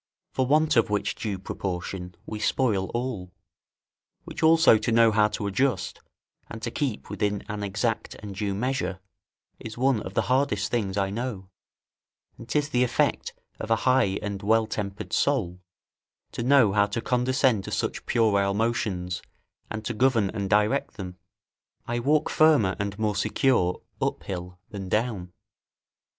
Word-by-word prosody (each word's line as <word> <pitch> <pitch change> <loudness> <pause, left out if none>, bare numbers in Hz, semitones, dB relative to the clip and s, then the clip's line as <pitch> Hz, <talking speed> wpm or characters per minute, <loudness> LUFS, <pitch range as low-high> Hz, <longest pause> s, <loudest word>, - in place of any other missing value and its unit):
For 130 -1 +1
want 155 +3 +3
of 115 -1 +4
which 105 -1 0
due 105 -4 -4
proportion 90 -1 -5
we 110 - -6
spoil 105 -5 +1
all; 120 -7 -3 0.9
which - - -8
also 160 -7 +6
to 115 - -1
know 115 0 +5
how 105 0 +4
to 105 -1 -4
adjust, 125 +7 0 0.5
and 115 - -7
to 120 - -2
keep 135 -6 -3
within 105 -1 -1
an 105 0 -4
exact 105 +3 -2
and 105 -2 -8
due 100 0 -2
measure, 125 -4 -2 0.6
is 115 0 -8
one 130 -3 +2
of 95 +2 -8
the - - +2
hardest 135 +3 +1
things 100 -5 -1
I 95 -1 0
know, 105 -4 -4 0.9
and 115 - -12
'tis 150 0 +1
the 125 -4 +2
effect 125 -1 0 0.2
of 110 - -5
a 115 - +5
high 125 -7 +3
and 100 -2 -4
well 110 +2 +3
tempered 100 -2 -5
soul, 90 -11 +1 0.7
to - - -5
know 125 -5 +5
how 100 0 +4
to 115 - -3
condescend 125 -4 +1
to - - -6
such - - -2
puerile 100 -3 +2
motions 100 -6 -1 0.5
and 110 0 -5
to 120 - -2
govern 115 -4 +2
and 100 -3 -3
direct 105 +6 +2
them. 90 -3 -7 0.7
I 120 0 -2
walk 150 +5 +2
firmer 145 -12 +4
and 100 0 -3
more 105 -1 0
secure 100 -3 +1 0.2
up - - -1
hill 90 -1 -6
than 95 -3 -6
down. 105 -5 -1
110 Hz, 160 wpm, -26 LUFS, 100-125 Hz, 0.9 s, also